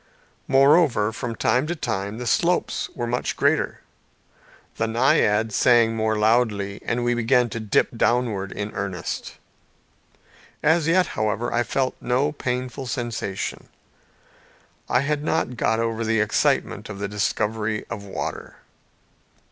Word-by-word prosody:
Moreover, 135 -5 +4
from 120 -1 -4
time 125 +7 +1
to 175 - -2
time 105 - -3
the 125 - -5
slopes 175 +9 +1
were 120 - -2
much 120 +1 -2
greater, - - +1 1.0
the 115 - 0
naiad 110 -2 +2
sang 115 0 +4
more 110 -1 0
loudly, 105 -3 +1
and 120 0 -1
we 120 0 +2
began 120 +1 +2
to 115 - -4
dip 110 +2 +1
downwards 115 -5 0
in 105 0 -4
earnest. 95 -4 -4 1.3
As 160 0 +3
yet, 180 +2 +4
however, 110 +2 -1
I 120 - +2
felt 130 +1 -1
no 130 +4 +1
painful 130 -1 -4
sensation. 120 -6 -4 1.2
I 125 - +3
had 145 +1 -1
not 155 -5 0
got 110 -1 +1
over 115 0 -1
the 115 0 +1
excitement 105 +1 0
of 100 - -6
the 100 0 -3
discovery 105 +1 -1
of 105 -3 -5
water. 100 - -6
115 Hz, 130 wpm, -23 LUFS, 105-125 Hz, 1.3 s, Moreover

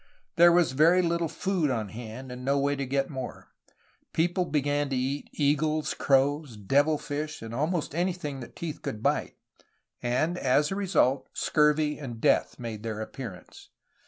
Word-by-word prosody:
There 175 0 +7
was 170 -4 +4
very 165 +7 +5
little 170 0 +1
food 185 -4 -1
on 110 -5 -2
hand, 120 +4 -8
and 125 0 -7
no 140 +2 +2
way 140 +1 +1
to 140 -1 -3
get 135 +2 0
more. 130 -3 -7 0.6
People 175 +3 +1
began 145 -1 0
to 135 - -1
eat 135 +3 -2
eagles, 150 +1 +1
crows, 140 -2 +1
devil 145 +9 +2
fish, 150 -1 -5
and 115 0 -7
almost 155 +4 -1
anything 170 -5 -2
that 120 - -10
teeth 165 -3 -5
could 110 - -5
bite, - - 0 0.7
and, 155 +9 0
as 140 +4 +2
a - - -1
result, 160 -9 +1
scurvy 150 0 +2
and 120 -6 -7
death - - +2
made 115 -3 -6
their 110 -1 -4
appearance. 110 -4 -8
145 Hz, 160 wpm, -28 LUFS, 130-155 Hz, 0.7 s, There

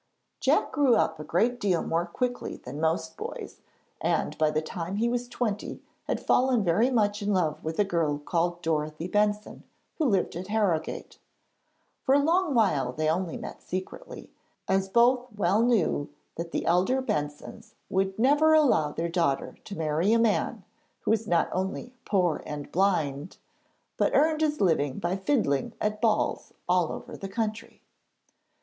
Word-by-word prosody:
Jack - - +2
grew 280 -5 +4
up 160 -7 +1
a - - -5
great 235 +11 +1
deal 185 -5 +1
more 170 +1 -1
quickly 245 +7 -3
than 150 - -8
most 160 0 0
boys, - - -7 0.4
and - - 0
by 155 -1 +4
the 155 0 0
time 170 +3 -5
he 225 +3 +1
was 245 0 -1
twenty 225 -4 -3 0.3
had - - -1
fallen 250 -3 +2
very 200 +8 +3
much 210 -4 +1
in 205 0 0
love 170 -6 0
with 160 +1 -4
a 210 - +4
girl 165 -6 0
called 170 +3 -1
Dorothy 155 +1 -1
Benson, 210 +2 0 0.4
who 315 - +2
lived 195 - +1
at 180 +2 -5
Harrogate. 205 -7 -1 0.8
For 270 - +3
a - - +5
long 330 0 +2
while 150 - +2
they 155 +4 -1
only 170 +1 -1
met - - -8
secretly, 185 - -7 0.4
as 190 0 +1
both 245 +3 +3
well 200 +2 +2
knew 220 -11 +1 0.3
that 170 +1 -5
the - - -3
elder 180 +10 +2
Bensons 150 - -4
would 190 0 0
never 295 +6 +4
allow 245 - +3
their 165 +3 -2
daughter 165 -5 -1
to 200 - -7
marry 160 +6 +1
a - - +5
man 230 -2 0 0.4
who - - 0
was 220 0 +1
not 170 -4 +2
only 190 +6 -3
poor 180 -6 +1
and 145 -1 -6
blind, 165 -5 0 0.6
but - - +1
earned 310 +2 +3
his 300 -1 +1
living 145 -7 +1
by 175 +2 -1
fiddling 195 - 0
at 210 0 -2
balls 220 -2 0
all 180 -2 +2
over - - -7
the 195 - -7
country. 220 +1 -4
190 Hz, 165 wpm, -27 LUFS, 165-230 Hz, 0.8 s, a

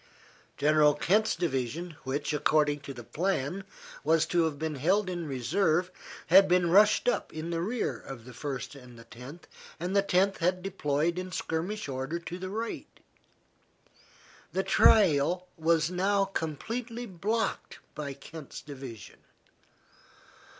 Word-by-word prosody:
General 150 0 +4
Kent's 210 +8 +2
division, 155 +2 -2
which, 145 +3 -2
according 150 -1 +2
to 140 -1 -8
the 120 -3 -9
plan, 165 - -2 0.4
was 160 +1 +3
to 170 0 +2
have 155 -3 -2
been 160 +1 -2
held 185 +9 +1
in 175 -3 -4
reserve, 160 +7 +1 0.3
had 190 +3 +7
been 180 -2 +3
rushed 210 +5 +5
up 245 - 0
in 160 +2 -5
the 165 0 -1
rear 225 +7 -2
of 120 -4 -10
the 125 - -11
First 135 +2 -5
and 125 -4 -13
Tenth, 130 +9 -11 0.3
and 180 +4 -2
the 200 - +6
Tenth 195 0 +2
had 180 +1 +1
deployed 170 -2 0
in 185 0 -6
skirmish 180 +5 -3
order 135 +4 -3
to 170 +1 -7
the 185 0 -5
right. 225 +4 -5 1.5
The - - +1
trail 180 -2 +4
was 160 0 +2
now 195 +2 +2
completely 225 - -4
blocked 215 +3 -2 0.2
by 145 -2 -5
Kent's 150 +1 -10
division. 130 -6 -9
165 Hz, 135 wpm, -29 LUFS, 145-190 Hz, 1.5 s, had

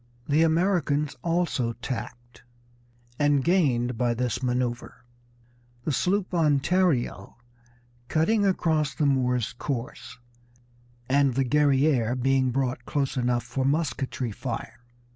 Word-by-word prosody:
The 150 +2 +3
Americans 160 -3 +1
also 165 -9 0
tacked, 120 0 -7 0.8
and 145 -2 +3
gained 125 -9 +1
by 120 -1 +1
this 125 0 -2
manoeuvre, 125 -1 -2 0.9
the 155 - -1
sloop 185 +6 0
Ontario 160 -3 +1 0.7
cutting 205 - +2
across 160 -6 +1
the 150 - 0
Moor's 125 -4 +1
course, 120 -1 -5 0.9
and 140 -1 +2
the 135 0 +1
Guerrière 135 -3 +2
being 135 0 +2
brought 125 -1 -2
close 140 -2 -1
enough 120 -1 0
for 135 - -3
musketry 135 -4 -1
fire. 115 +1 -6
135 Hz, 105 wpm, -26 LUFS, 125-155 Hz, 0.9 s, The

